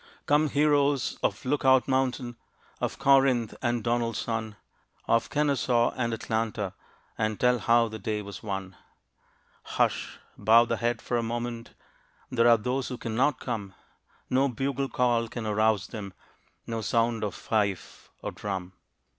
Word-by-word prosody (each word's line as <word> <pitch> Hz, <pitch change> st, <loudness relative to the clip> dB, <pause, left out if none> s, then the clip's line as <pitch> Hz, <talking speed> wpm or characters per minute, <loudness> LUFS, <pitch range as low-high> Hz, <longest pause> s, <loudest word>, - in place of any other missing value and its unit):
Come, 150 Hz, +1 st, +3 dB
heroes 145 Hz, -2 st, +2 dB
of 105 Hz, -, -1 dB
Look 145 Hz, +3 st, 0 dB
Out 130 Hz, -1 st, +5 dB
Mountain, 130 Hz, -2 st, 0 dB, 0.4 s
Of -, -, -2 dB
Corinth 135 Hz, -5 st, +3 dB
and 120 Hz, -2 st, 0 dB
Donelson, 115 Hz, -2 st, -1 dB, 0.5 s
Of 115 Hz, -, +2 dB
Kenesaw 140 Hz, -5 st, +2 dB
and 120 Hz, -2 st, -1 dB
Atlanta, 110 Hz, -3 st, -2 dB, 0.5 s
And 110 Hz, -1 st, -1 dB
tell 125 Hz, 0 st, +3 dB
how 115 Hz, +1 st, +3 dB
the 110 Hz, 0 st, -7 dB
day 105 Hz, -1 st, -2 dB
was 100 Hz, 0 st, -9 dB
won! 95 Hz, -3 st, -5 dB, 0.9 s
Hush! -, -, -1 dB, 0.2 s
bow 115 Hz, +2 st, +6 dB
the -, -, -1 dB
head 120 Hz, -1 st, -1 dB
for 120 Hz, -, -1 dB
a -, -, +1 dB
moment 120 Hz, 0 st, -4 dB, 0.6 s
There 120 Hz, -1 st, +3 dB
are 120 Hz, -1 st, +7 dB
those 125 Hz, +4 st, -2 dB
who 125 Hz, -, -5 dB
cannot 125 Hz, +6 st, 0 dB
come. 105 Hz, -6 st, -5 dB, 0.5 s
No 135 Hz, +2 st, +2 dB
bugle 135 Hz, +2 st, -2 dB
call 120 Hz, -2 st, +1 dB
can 115 Hz, 0 st, -6 dB
arouse 105 Hz, -1 st, +2 dB
them 100 Hz, -2 st, -7 dB, 0.5 s
No 115 Hz, -1 st, -3 dB
sound 115 Hz, 0 st, +1 dB
of 105 Hz, -, -2 dB
fife 100 Hz, -4 st, -2 dB
or -, -, -3 dB
drum. 95 Hz, -3 st, -5 dB
115 Hz, 145 wpm, -27 LUFS, 110-130 Hz, 0.9 s, are